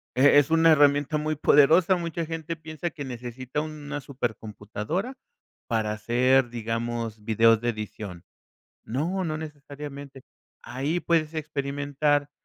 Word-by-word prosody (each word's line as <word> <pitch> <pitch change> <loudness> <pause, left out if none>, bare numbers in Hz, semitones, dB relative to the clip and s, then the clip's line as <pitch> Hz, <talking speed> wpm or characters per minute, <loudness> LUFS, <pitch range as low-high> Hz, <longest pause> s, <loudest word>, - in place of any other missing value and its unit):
e 140 +3 +6
es 145 0 +1
una 165 0 +6
herramienta 145 0 +4
muy 155 +1 -1
poderosa. 160 +6 +5
Mucha 170 -1 -3
gente 165 0 -5
piensa 155 +1 -5
que 145 -5 -7
necesita 125 +3 -5
una 150 -1 -6
súper 125 -5 -3
computadora 110 - -5 0.5
para 110 -2 0
hacer, 120 +4 +2
digamos, 115 -1 -3
videos 115 +1 +4
de 120 - 0
edición. 105 -5 -6 0.6
No, 165 +11 -2
no 155 -1 -2
necesariamente. 145 -2 -9 0.4
Ahí 140 +8 -2
puedes 165 -2 +1
experimentar. 145 -1 -1
140 Hz, 125 wpm, -26 LUFS, 120-155 Hz, 0.6 s, e